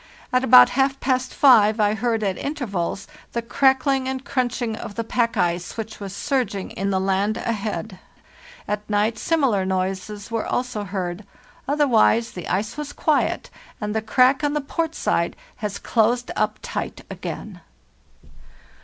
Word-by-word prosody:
At 255 0 +3
about 250 -1 +8
half 270 +1 +1
past 255 -1 0
five 220 -5 +5
I 210 0 +3
heard 225 0 0
at 195 -2 0
intervals 205 - -3 0.3
the 235 - -1
crack 265 +3 +3
ling 270 -2 +1
and 265 0 -4
crunching 245 -3 -1
of 210 - -8
the 230 - -2
pack 230 0 0
ice 175 +1 -1
which 220 -1 -6
was 200 -2 -6
surging 235 -5 -1
in 195 +1 -2
the 190 -1 +1
lane 195 +2 +1
ahead. 215 -3 -3 0.7
At 210 0 -3
night 210 +2 +1
similar 270 - +2
noises 190 +3 -3
were 230 -1 -1
also 245 -5 -2
heard; 185 0 -4 0.4
otherwise 240 -5 +3
the 180 - -7
ice 210 +8 -2
was 295 -1 -5
quiet, 310 -2 0 0.3
and 210 -1 -3
the 220 - +1
crack 255 +5 +3
on 290 0 +1
the 300 - 0
port 325 +3 -2
side - - 0 0.2
has 210 -3 -4
closed 240 +2 +1
up 215 0 0
tight - - -4
again. - - -7
225 Hz, 155 wpm, -23 LUFS, 205-255 Hz, 0.7 s, about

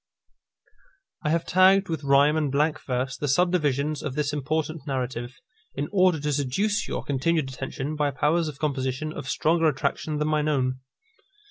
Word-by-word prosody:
_ - - -35 0.5
I 150 - 0
have 165 +1 +1
tagged 190 +1 +5
with 160 -3 -3
rhyme 140 +2 +4
and 150 -3 0
blank 150 +3 +1
verse 125 0 -1
the 145 +3 -3
subdivisions 150 -2 +1
of 140 -3 -4
this 145 -1 -1
important 155 +1 -2
narrative, 125 -2 -3 0.4
in 145 +2 -3
order 185 -5 +3
to 150 0 -1
seduce 145 +11 0
your - - -3
continued 145 +1 0
attention 135 +3 -5
by 150 -1 +1
powers 155 +4 +1
of 150 -3 -6
composition 140 0 -2
of 135 - -6
stronger 165 +5 +2
attraction 150 +1 -1
than 150 0 0
my 155 -1 +1
own. 130 -4 0
150 Hz, 165 wpm, -25 LUFS, 135-160 Hz, 0.5 s, tagged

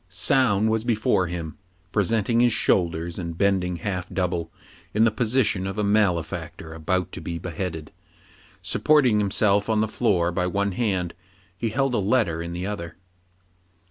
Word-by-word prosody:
Soun 105 +2 +2
was 110 0 +1
before 110 -6 +1
him, 85 +2 -6 0.3
presenting 110 +3 +1
his 120 0 +4
shoulders, 85 -4 +1
and 85 -2 -5
bending 95 -2 +1
half 90 +1 -4
double 85 -3 -2 0.5
in 110 - +4
the 115 - +4
position 110 -4 +1
of 95 - -5
a 105 - 0
male 100 -5 +3
factor 80 0 -8
about 85 +2 -1
to - - -7
be 85 - -4
beheaded. 85 -2 -5 0.7
Supporting 130 -8 +3
himself 100 +1 +2
on 110 -1 +2
the 110 - +1
floor 95 -7 +1
by 90 +1 -1
one 100 +2 0
hand, 95 -5 -1 0.4
he 115 +5 -2
held 135 +3 0
a 120 - +2
letter 100 -5 +1
in 85 0 -5
the 90 +2 -4
other. 85 -5 -5
95 Hz, 160 wpm, -24 LUFS, 85-110 Hz, 0.7 s, his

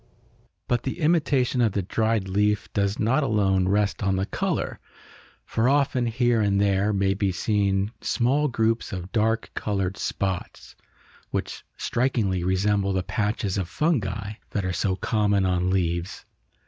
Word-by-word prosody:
But 120 -1 +1
the 135 +6 -4
imitation 145 -6 +2
of 110 -5 +2
the 100 - -1
dried 110 +1 0
leaf 105 +1 0
does 100 0 0
not 125 +7 +2
alone 100 -7 +2
rest 100 +1 +1
on 95 -1 +1
the 95 +1 0
color, - - -2 0.7
for 115 +3 +1
often, 135 -3 +2
here 120 -1 +2
and 100 -1 +2
there, 100 +1 +2
may 95 -1 +1
be 100 0 0
seen 100 +1 0
small 135 +5 +1
groups 115 -2 0
of 90 0 -6
dark 110 +1 0
colored 95 -2 -2
spots 95 -3 -4 0.5
which - - -4
strikingly 115 -8 0
resemble 100 +2 +1
the 95 -1 0
patches 105 -2 -1
of 90 -2 -3
fungi 105 - -1 0.2
that 100 -3 -2
are 95 - -1
so 95 +2 0
common 100 0 +1
on 90 0 +1
leaves. 85 -1 -1
100 Hz, 150 wpm, -25 LUFS, 95-115 Hz, 0.7 s, imitation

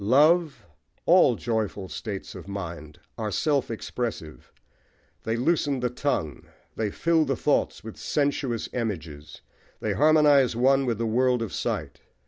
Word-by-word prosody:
Love, 150 - +3 0.4
all - - +5
joyful 110 -4 -2
states 100 0 -6
of - - -10
mind, 85 -6 -7 0.2
are 110 -1 -2
self 140 - 0
expressive: 115 -7 -5 0.7
they 110 - 0
loosen 140 +1 +1
the 125 -1 -1
tongue, 125 - -2 0.3
they 110 -2 -1
fill 165 +8 +2
the 135 -2 -1
thoughts - - 0
with - - -9
sensuous 140 -5 -1
images, 80 - -5 0.4
they - - -1
harmonise 145 -5 +4
one 135 +2 +3
with 115 -3 0
the 115 - -1
world 125 +1 +2
of 110 - -6
sight. - - -3
120 Hz, 135 wpm, -26 LUFS, 105-140 Hz, 0.7 s, all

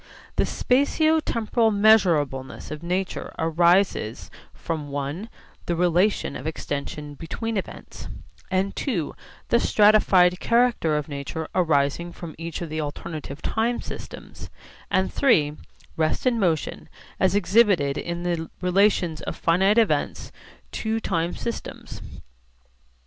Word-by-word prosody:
The - - +3
spatio 310 +5 +2
temporal 230 0 +1
measurableness 165 -13 +2
of 150 0 -6
nature 180 +2 -3
arises 170 - +2 0.2
from 155 -4 -5
(i) 145 +10 -4 0.4
the 175 - 0
relation 180 0 +1
of 135 - -5
extension 145 -1 -5
between 220 - -4
events, 195 - -6 0.4
and 190 +1 0
(ii) 180 - -1 0.4
the 235 - +4
stratified 195 -5 +4
character 235 -10 +2
of 150 - -3
nature 145 +2 -5
arising 160 0 +1
from 170 -2 -8
each 170 +1 -5
of 165 - -6
the 155 +1 -2
alternative 150 0 -6
time 230 +2 0
systems, - - -9 0.4
and 190 0 +1
(iii) 155 - +3 0.4
rest 155 +7 0
and 245 -2 +2
motion, 170 -6 -1 0.3
as 190 +1 +3
exhibited 195 -8 +3
in 170 +2 -4
the 170 -2 -2
relations 180 -3 +2
of - - -5
finite 190 +6 +2
events 225 -2 +1 0.4
to 220 0 -2
time 170 -5 -1
systems. 235 - -6
175 Hz, 120 wpm, -24 LUFS, 155-210 Hz, 0.4 s, the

